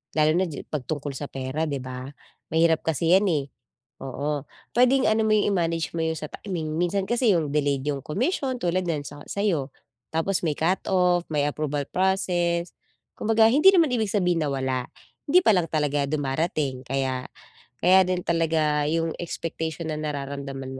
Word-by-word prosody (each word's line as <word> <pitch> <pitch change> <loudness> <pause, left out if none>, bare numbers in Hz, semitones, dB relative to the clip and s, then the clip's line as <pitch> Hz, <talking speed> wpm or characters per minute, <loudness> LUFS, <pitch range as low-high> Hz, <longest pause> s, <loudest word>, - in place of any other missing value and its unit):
lalo 155 0 +4
na 190 - +2
ji 155 -5 -6
'pag 145 -5 -5
tungkol 145 -2 -3
sa 145 - -5
pera 135 +4 -3
'di 140 -3 -3
ba? 130 0 -6 0.5
Mahirap 165 -1 +3
kasi 165 +2 +1
'yan 200 - +1
eh, 150 -6 +1 0.6
oo, 145 +2 -3 0.3
pwedeng 255 0 +4
ano 220 0 +2
mo 215 - +3
'yong 205 - +2
i-manage 165 -3 0
mo 160 - 0
'yong 160 0 -1
sa 155 - -6
timing, 165 -6 -4
minsan 180 +3 0
kasi 240 -3 +3
'yong 155 -4 0
delayed 145 -2 +1
'yong 145 -2 -1
commission 260 - -1
tulad 180 +1 0
n'yan 155 -3 -1
sa 145 0 -9
sayo 170 -10 -1 0.4
tapos 170 +4 0
may 160 - +1
cut-off, 180 0 +2
may 145 -1 +1
approval 145 -1 -2
process, 175 -2 0 0.4
kumbaga 225 0 +4
hindi 300 +11 +6
naman 335 -5 +4
ibig 220 -4 -1
sabihin 180 -5 +1
na 145 - -1
wala, 130 -2 -1 0.4
hindi 345 +6 +5
pa 220 - +4
lang 170 -3 0
talaga 145 -2 +1
dumarating 140 -1 -1
kaya 130 -1 -2 0.6
kaya 185 +1 +6
din 180 -1 -1
talaga 155 -3 +1
'yong 165 +1 0
expectation 160 -1 -4
ng 155 - -3
nararamdaman 140 -2 -5
160 Hz, 170 wpm, -25 LUFS, 145-185 Hz, 0.6 s, hindi